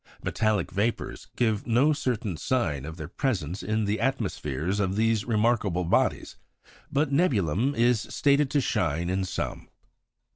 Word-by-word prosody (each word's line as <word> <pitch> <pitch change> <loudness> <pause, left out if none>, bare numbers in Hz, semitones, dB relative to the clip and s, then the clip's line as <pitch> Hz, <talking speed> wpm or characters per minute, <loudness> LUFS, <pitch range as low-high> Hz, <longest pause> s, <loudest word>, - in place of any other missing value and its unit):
Metallic 110 -5 0
vapours 110 +4 -2
give 110 -3 0
no 130 +7 +4
certain 115 - -2
sign 80 - -1
of 80 +2 -7
their 80 -3 -6
presence 95 - -2
in 110 +3 -1
the 105 +2 -1
atmospheres 95 - -1
of 95 -1 0
these 110 -1 +1
remarkable 105 -5 +1
bodies; 85 - 0 0.5
but 140 0 +1
nebulum 130 - +2
is 120 -1 +3
stated 140 0 +2
to 145 - +2
shine 85 - 0
in 95 +1 0
some. - - -4
110 Hz, 140 wpm, -27 LUFS, 90-125 Hz, 0.5 s, no